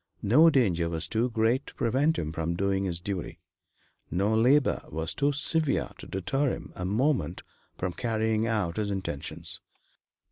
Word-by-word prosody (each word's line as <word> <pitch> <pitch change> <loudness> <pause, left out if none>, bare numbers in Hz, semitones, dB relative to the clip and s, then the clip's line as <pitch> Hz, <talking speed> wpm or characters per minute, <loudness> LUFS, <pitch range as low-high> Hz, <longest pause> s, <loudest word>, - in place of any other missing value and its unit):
No 150 +11 +6
danger 95 - +2
was 80 -1 -1
too 115 +3 0
great 115 +4 +1
to - - -10
prevent 135 +6 +1
him 75 -1 -2
from 80 +1 -2
doing 95 +1 0
his 85 -2 -2
duty; 95 0 -5 0.7
no 100 +5 +1
labor 130 +6 +3
was 80 +1 -2
too 145 +1 +1
severe 150 +1 0
to - - -9
deter 100 +10 0
him - - -6
a 90 - -4
moment 105 - 0 0.3
from 90 -1 -2
carrying 110 -1 0
out 105 -6 -1
his 105 -1 -1
intentions. 95 -8 -3
110 Hz, 155 wpm, -28 LUFS, 90-130 Hz, 0.7 s, No